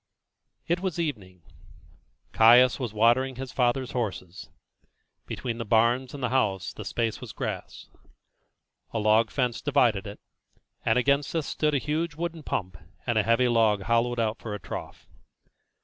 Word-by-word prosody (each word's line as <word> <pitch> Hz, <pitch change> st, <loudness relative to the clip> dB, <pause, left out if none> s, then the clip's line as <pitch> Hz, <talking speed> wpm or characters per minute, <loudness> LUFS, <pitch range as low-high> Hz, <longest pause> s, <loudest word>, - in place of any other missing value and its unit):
It 170 Hz, +1 st, +1 dB
was 185 Hz, -2 st, -3 dB
evening. 95 Hz, -, -4 dB, 0.9 s
Caius 120 Hz, +4 st, +6 dB
was 125 Hz, -5 st, -3 dB
watering 120 Hz, +5 st, +2 dB
his 130 Hz, 0 st, -6 dB
father's 125 Hz, 0 st, 0 dB
horses. 95 Hz, -6 st, -4 dB, 0.8 s
Between 120 Hz, -2 st, -4 dB
the -, -, -2 dB
barns 120 Hz, +5 st, +2 dB
and 140 Hz, -, -7 dB
the -, -, +1 dB
house 100 Hz, -8 st, 0 dB
the -, -, -8 dB
space 115 Hz, -2 st, -2 dB
was -, -, -8 dB
grass; -, -, -6 dB, 1.0 s
a -, -, -4 dB
log 110 Hz, +1 st, +3 dB
fence 125 Hz, 0 st, -1 dB
divided 125 Hz, -9 st, +2 dB
it, 100 Hz, -, -9 dB, 0.6 s
and 110 Hz, -, +2 dB
against 140 Hz, +2 st, +1 dB
this 160 Hz, -3 st, -1 dB
stood 150 Hz, +1 st, 0 dB
a -, -, +4 dB
huge 155 Hz, +3 st, -2 dB
wooden 165 Hz, 0 st, -4 dB
pump 90 Hz, -, -4 dB, 0.3 s
and 120 Hz, -3 st, +1 dB
a -, -, +5 dB
heavy 115 Hz, +4 st, +2 dB
log 110 Hz, -4 st, +2 dB
hollowed 115 Hz, +2 st, +1 dB
out 110 Hz, 0 st, -1 dB
for 105 Hz, -2 st, -5 dB
a -, -, -7 dB
trough. -, -, -8 dB
120 Hz, 155 wpm, -26 LUFS, 110-135 Hz, 1.0 s, Caius